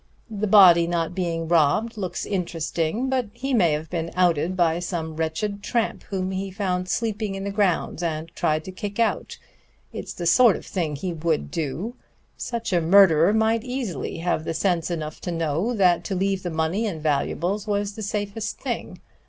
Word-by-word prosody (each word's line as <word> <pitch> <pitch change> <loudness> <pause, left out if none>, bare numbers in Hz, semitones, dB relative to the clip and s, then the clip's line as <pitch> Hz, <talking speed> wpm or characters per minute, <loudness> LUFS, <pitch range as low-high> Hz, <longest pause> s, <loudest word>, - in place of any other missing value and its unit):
The 215 0 -2
body 180 -5 +7
not 170 0 -1
being 170 -3 -2
robbed 170 +8 +2
looks 190 -4 -4
interesting, 170 - -2
but 260 -3 0
he 270 +3 -3
may 175 -10 +4
have 155 +2 -3
been 165 -1 -2
outed 180 0 +2
by 170 -1 +2
some 165 -3 -4
wretched 165 +6 -2
tramp 230 +2 -1
whom 190 -1 -2
he 190 +1 -3
found 185 -2 -2
sleeping 215 -1 -1
in 195 - -5
the 200 - -3
grounds 195 -5 0
and 160 -2 -2
tried 155 -2 0
to 185 - -7
kick 200 +3 -6
out. 230 -2 0 0.6
It's - - -6
the 175 - -5
sort 210 +5 +6
of - - -8
thing 165 -6 -2
he 175 +5 -3
would 160 - -1
do. 165 - -3 0.4
Such 235 -4 -4
a 175 - +3
murderer 170 -1 +6
might 220 +1 +2
easily 245 - -4
have 165 -1 -1
sense 170 -1 0
enough 155 -3 -4
to 175 - -3
know 165 +6 -1
that 180 -4 +3
to 195 - -2
leave 195 +1 0
the 180 - -3
money 160 +7 0
and 170 -6 -4
valuables 170 +7 -1
was 205 0 -1
the 220 - -8
safest 205 +1 -3
thing. - - -4
180 Hz, 180 wpm, -24 LUFS, 165-205 Hz, 0.6 s, body